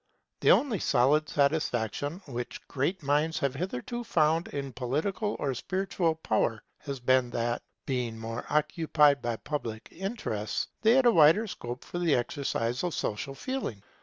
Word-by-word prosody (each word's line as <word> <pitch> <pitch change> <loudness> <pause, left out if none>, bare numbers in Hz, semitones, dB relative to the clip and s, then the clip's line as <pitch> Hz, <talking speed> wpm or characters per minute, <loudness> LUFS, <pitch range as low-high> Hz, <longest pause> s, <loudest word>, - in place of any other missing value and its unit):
The - - +3
only 245 -9 +4
solid 145 +4 +3
satisfaction 145 - 0
which 120 -3 -6
great 155 +6 -1
minds 150 +3 +1
have 140 -4 0
hitherto 180 - -4
found 165 -6 +2
in 140 -2 -5
political 155 - -1
or 135 -2 -1
spiritual 180 +3 -1
power 110 -6 0 0.2
has 140 -3 -5
been 130 0 +3
that, 120 0 -1 0.2
being 125 -4 -2
more 115 +1 -5
occupied 150 -1 +3
with 115 -1 -3
public 115 -7 -4
interests, 175 - -3
they 220 +1 +5
had 260 0 +4
a 240 - +7
wider 165 +4 +6
scope 120 - -6
for 175 - -5
the 170 -4 +3
exercise 120 0 -1
of 175 -2 -1
social 125 +6 -3
feeling. 250 - -4
145 Hz, 150 wpm, -29 LUFS, 120-175 Hz, 0.2 s, a